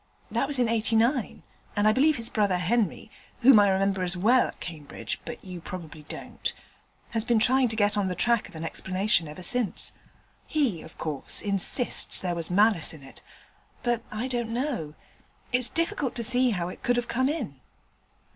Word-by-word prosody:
That 275 - 0
was 285 -1 0
in 245 -2 +2
'89, 230 +2 +1 0.3
and 205 0 +2
I 215 - +5
believe 295 +5 +3
his 230 -2 -2
brother 205 -6 +1
Henry 215 +3 -1 0.3
(whom 250 -3 +8
I 205 -1 +5
remember 195 0 +1
as 180 0 0
well 235 +7 +4
at - - -11
Cambridge, 155 -5 -7
but 240 - -8
you 180 -2 -8
probably 165 -3 -8
don't) - - -5 0.6
has 225 -2 -1
been 235 0 +2
trying 255 +3 +4
to 220 - -3
get 205 -1 +2
on 205 -2 0
the 180 - -2
track 235 0 +1
of 195 - -16
an 160 - -6
explanation 185 +1 0
ever 150 +5 -9
since. 245 +1 +2 0.5
He, 260 - 0
of 160 - -13
course, 150 -4 -1
insists 205 +5 +3
there 180 -2 +2
was 170 -1 -5
malice 200 -3 +3
in 145 - -14
it, 135 - -13 0.6
but 240 -1 0
I 220 +4 -3
don't 240 -3 -2
know. 235 - -3 0.6
It's 250 -1 +3
difficult 325 -5 -1
to 235 - -2
see 250 +2 +2
how 180 -6 -1
it - - -10
could 245 - +1
have 245 0 -1
come 260 +2 +1
in.' 240 - -4
215 Hz, 185 wpm, -27 LUFS, 180-245 Hz, 0.6 s, whom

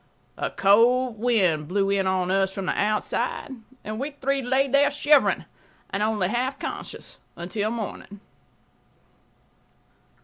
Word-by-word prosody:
A - - -1
cold 235 +4 +3
wind 190 -11 +2
blew 195 +3 0
in 195 -1 +1
on 185 -1 0
us 195 0 +2
from 195 0 -5
the - - 0
outside, 210 +6 -1 0.3
and 215 +1 -5
we 275 +3 -2
three 275 +1 0
lay 265 +2 +1
there 280 +2 +4
shivering 290 0 +3 0.5
and 195 - -2
only 210 -3 +1
half 250 +6 -1
conscious - - -7 0.2
until 205 +5 -2
morning. 215 -2 -6
215 Hz, 130 wpm, -25 LUFS, 195-255 Hz, 0.5 s, there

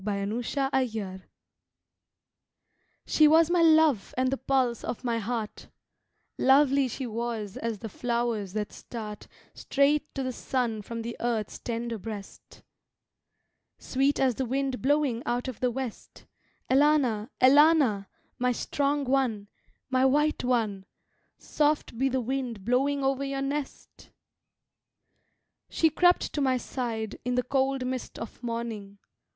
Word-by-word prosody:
Fairy 205 +3 -2
Singing 230 -8 -1 1.8
SHE 310 - +5
was 325 +2 +5
my 350 -1 +3
love 315 -8 +4
and 255 0 +1
the 270 - 0
pulse 260 -3 0
of 245 - -5
my 235 -2 0
heart; 225 -1 -4 0.7
Lovely 275 0 +4
she 255 +2 -5
was 225 -3 -4
as 230 -2 -3
the 225 - -7
flowers 235 -3 -2
that 210 -1 -3
start 215 -3 -8 0.3
Straight 290 +2 +1
to 270 - -2
the 255 - -2
sun 240 -3 -2
from 230 +2 -6
the 235 +1 -5
earth's 230 -3 -2
tender 235 -1 -4
breast, 205 -1 -9 1.1
Sweet 275 +2 0
as 260 -2 +3
the 260 +3 -2
wind 265 0 -1
blowing 275 -3 +1
out 245 +2 -1
of 255 - -6
the 250 - +1
west 250 -2 -7 0.4
Elana, 265 -6 +3
Elana, 270 -7 +5 0.3
my 250 0 +2
strong 285 +3 -1
one, 250 -6 0 0.4
my 260 0 +3
white 295 +3 +2
one, 220 -6 0 0.5
Soft 295 -4 0
be 265 +3 +1
the 260 0 0
wind 245 -5 -3
blowing 275 +4 +1
over 270 0 +1
your 275 0 -2
rest! 285 0 -6 1.6
She 320 -1 +2
crept 355 +3 +3
to 295 - -1
my 260 -2 +2
side 230 -4 -4
In 250 0 -1
the 250 - +1
cold 265 0 0
mist 255 0 -4
of 230 - -8
morning. 230 -4 -5
250 Hz, 135 wpm, -27 LUFS, 225-275 Hz, 1.8 s, SHE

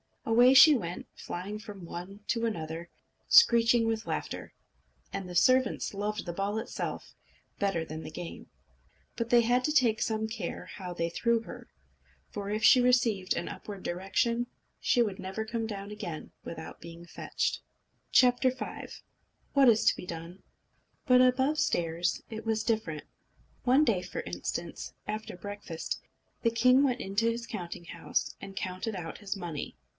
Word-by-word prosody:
Away 240 +3 +6
she 300 +4 +10
went, 180 -9 -3
flying 200 +4 -6
from 205 -4 -9
one 185 +5 -8
to 230 -1 +1
another, 165 -4 -5 0.4
screeching 235 - +6
with 225 -1 -1
laughter. - - -4 0.6
And 190 -2 -4
the 180 - -7
servants 255 +5 +3
loved 210 +1 -3
the 175 - -4
ball 200 +4 -1
itself 225 - -4 0.5
better 195 -5 +1
even 160 - -7
than 160 - -7
the - - -6
game. 175 +1 -7 0.7
But 230 -1 -2
they 240 -1 +6
had 245 +2 +2
to 305 - +1
take 235 -7 +3
some 220 -1 0
care 205 -5 -5
how 180 -1 -7
they 170 -1 -1
threw 235 +6 +1
her, - - -10 0.6
for 200 -1 -5
if 215 +1 -2
she 255 - +8
received 235 -6 +3
an 175 - -3
upward 200 -3 -8
direction, 215 +7 0 0.3
she 245 - +3
would 205 -4 -4
never 190 +3 -4
come 225 0 -2
down 200 -1 -6
again 195 -7 -6
without 160 -1 -8
being 170 +1 -10
fetched. - - -2 0.6
V 255 - +8 1.3
What 275 -3 +6
Is 220 -2 +4
to - - +5
Be - - -8
Done? 170 +2 -7 0.6
But 250 -2 +6
above 260 +4 +3
stairs 170 +1 0
it 220 0 -6
was 220 -1 0
different. 215 -10 -1 0.6
One 260 +4 +5
day, 200 -8 +2
for 180 - -5
instance, - - -5
after 215 -1 -4
breakfast, 205 -3 -5 0.4
the 230 - +3
king 255 +4 +5
went 255 -3 +1
into 205 +4 +1
his 235 0 -3
counting 175 -7 -6
house, - - -2
and 195 - -8
counted 185 +3 -3
out 165 -3 -6
his 205 -1 -3
money. 170 -6 -5
210 Hz, 160 wpm, -30 LUFS, 180-235 Hz, 1.3 s, she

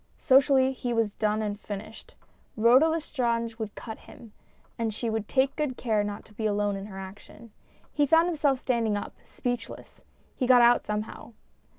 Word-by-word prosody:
Socially, 265 0 +4
he 245 -2 -3
was 225 -3 0
done 215 0 0
and 205 -1 -3
finished. 210 +1 -9 0.4
Rhoda 245 +7 +6
Lestrange 235 -7 -2
would 215 -2 -5
cut 220 -2 -8
him, 225 -3 -15 0.4
and 230 -1 -2
she 225 +2 -3
would 220 -1 -3
take 265 0 +1
good 290 -5 -2
care 215 -4 0
not 205 0 -6
to 215 - -19
be 220 +1 -2
alone 205 -1 0
in 195 +1 -6
her 195 -2 -10
action. 200 +4 -11 0.4
He 290 -1 +2
found 325 +3 +5
himself 295 -6 +1
standing 230 -5 0
up, 205 - -6
speechless. 245 -1 -6 0.3
He 255 - -1
got 245 -1 +7
out 240 +1 +4
somehow. 210 +2 -5
230 Hz, 175 wpm, -27 LUFS, 210-260 Hz, 0.4 s, got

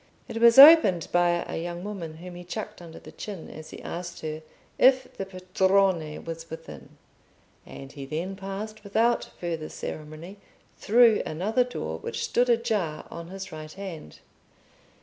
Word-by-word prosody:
It - - -6
was 235 +1 +7
opened 275 - +9
by 175 0 +2
a - - -4
young 175 +1 -5
woman 185 -6 -6
whom 180 +2 -10
he 175 0 -9
chucked 210 +3 -6
under 165 -2 -11
the - - -12
chin 200 -6 -8
as 155 +1 -10
he - - -11
asked 175 0 -6
her 155 0 -5 0.4
if 260 0 +4
the 195 - -5
Padrone 185 -3 +1
was 165 0 -7
within, 75 - -10 0.7
and 135 0 -10
he 140 -2 -9
then 170 +7 -4
passed, 200 +3 -7
without 225 +4 +1
further 165 -3 -4
ceremony, 155 +5 -8 0.4
through 230 0 +4
another 205 +10 0
door 80 - -5
which 115 - -4
stood 245 +1 +1
ajar 210 -9 0
on 170 0 -8
his 195 +2 -8
right 155 0 -8
hand. 185 - -8
180 Hz, 155 wpm, -26 LUFS, 160-210 Hz, 0.7 s, opened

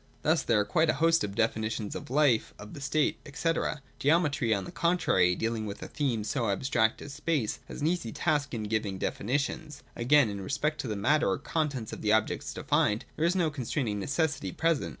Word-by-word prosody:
Thus - - +3
there 115 - +2
are 105 - +1
quite 155 +10 +2
a - - +3
host 165 0 +3
of 100 -1 -4
definitions 110 -1 -1
of - - -7
life, 135 -4 +2
of 105 - -10
the 140 - -8
state, 145 +2 +1 0.2
&c. 165 - 0 0.5
Geometry, 145 -5 +2
on 100 -3 +1
the - - -8
con 170 +1 +1
trary, 90 - +2
deahng 115 -1 -1
with 100 - -6
a - - -6
theme 130 -7 -1
so 115 +1 -1
abstract 110 +2 +1
as 140 - -8
space, 150 -6 -1
has - - -8
an - - 0
easy 165 -9 0
task 145 -1 0
in 110 - -3
giving 105 -2 -1
definitions. 140 +9 -2
Again, 130 +2 +4
in 100 -1 -5
respect 150 +8 -1
of 125 - -4
the 105 - -2
matter 145 +10 +2
or - - +1
contents 140 -5 -2
of - - -7
the 105 0 +2
objects 110 0 0
defined, 105 +1 +1
there 160 - 0
is 175 +2 +2
no 170 -4 +2
constraining 125 -5 -2
ne 100 - -4
cessity 145 -1 -1
present. 160 - +1
135 Hz, 210 wpm, -29 LUFS, 110-150 Hz, 0.5 s, Again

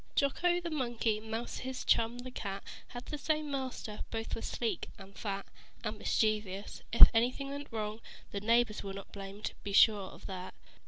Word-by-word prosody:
Jocko 350 +6 +3
the 340 -1 -4
Monkey, 240 -6 0
Mouser 225 +2 -4
his 260 0 -4
chum, 230 +1 +3
the 250 +1 -7
Cat, 200 -5 -4 0.2
Had 245 0 -8
the 300 - -5
same 305 0 0
master. 260 -5 -3
Both 225 0 -3
were - - -2
sleek 235 -2 -2
and 195 -1 -12
fat, 200 -2 -3 0.4
And 215 -1 -3
mischievous. 210 -2 0
If 235 - +12
anything 250 +4 +2
went 285 0 -6
wrong, 215 0 -3 0.3
The 200 - -3
neighbors 230 0 +3
where 195 -1 -5
not 195 - -8
blamed. 200 +1 -5
Be 200 - -4
sure 205 -2 +6
of - - -12
that. 185 -1 -6
225 Hz, 175 wpm, -33 LUFS, 205-255 Hz, 0.4 s, If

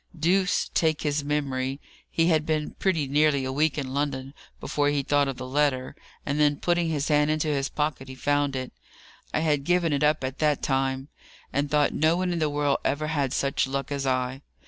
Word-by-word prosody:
Deuce 185 +4 +2
take 160 -2 +1
his 145 -1 0
memory! 135 -2 -1 0.3
he 165 - +1
had 160 -3 +3
been 155 -1 -1
pretty 165 -7 +1
nearly 145 -1 +2
a 130 - -2
week 150 +2 +1
in 135 -3 -3
London 140 -1 -2 0.3
before 145 -1 0
he 145 -1 0
thought 145 0 +2
of 135 -2 -4
the 130 - -6
letter, 135 -1 0 0.3
and 145 +1 -1
then 145 -1 +4
putting 175 0 +1
his 150 -3 -1
hand 150 0 +3
into 155 0 0
his 140 -2 0
pocket 150 -3 -2
he 130 - -8
found 145 +1 0
it. 130 -1 -4 0.6
I 155 - 0
had 150 -3 +1
given 175 0 +2
it 140 - 0
up 150 0 +3
by 130 0 -2
that 150 +2 0
time, 135 0 0 0.4
and 140 +1 0
thought 150 0 +2
no 160 +3 +2
one 180 -1 0
in 170 - -2
the 155 -1 +1
world 145 -1 +1
ever 150 +2 -1
had 140 -5 0
such 140 0 0
luck 140 +1 -3
as 140 -1 -2
I. 130 +1 -1
145 Hz, 210 wpm, -26 LUFS, 135-155 Hz, 0.6 s, then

